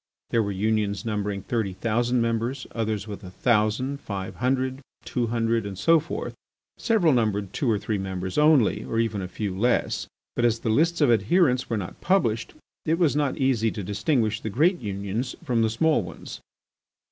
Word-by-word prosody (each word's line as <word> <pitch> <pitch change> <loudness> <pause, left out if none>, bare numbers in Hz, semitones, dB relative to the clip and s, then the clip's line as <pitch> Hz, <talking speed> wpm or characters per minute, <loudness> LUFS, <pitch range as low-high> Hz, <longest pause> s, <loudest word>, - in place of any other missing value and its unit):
There 115 - +3
were 100 -2 -1
unions 105 +1 0
numbering 105 -3 -2
thirty 110 -5 -1
thousand 120 +4 0
members, 115 +3 -1
others 110 -2 -2
with 105 0 -7
a 90 - -8
thousand, 120 +6 +1
five 95 -2 -5
hundred, 130 +1 0 0.2
two 120 -2 -1
hundred, 115 0 0
and 100 -2 -6
so 165 - +5
forth. 160 - -5 0.5
Several 200 - +3
numbered 105 -5 0
two 135 - 0
or 110 - +3
three 105 0 -2
members 95 -1 -4
only, 150 -9 +4
or 115 - -3
even 110 -3 0
a 90 - -4
few 95 +1 -4
less. 120 +5 0 0.3
But 120 - 0
as 115 -1 +3
the 115 - -1
lists 165 +7 +2
of 145 - +5
adherents 125 - +3
were 115 - 0
not 95 -4 -6
published, 115 - +1 0.3
it 160 +1 +1
was 165 -5 +2
not 145 -3 0
easy 125 -4 +2
to 105 - -5
distinguish 110 - 0
the 110 - -3
great 165 - +2
unions 100 +3 -3
from 120 -3 +1
the 110 - +3
small 150 +4 +2
ones. 90 -3 -9
115 Hz, 180 wpm, -25 LUFS, 105-130 Hz, 0.5 s, so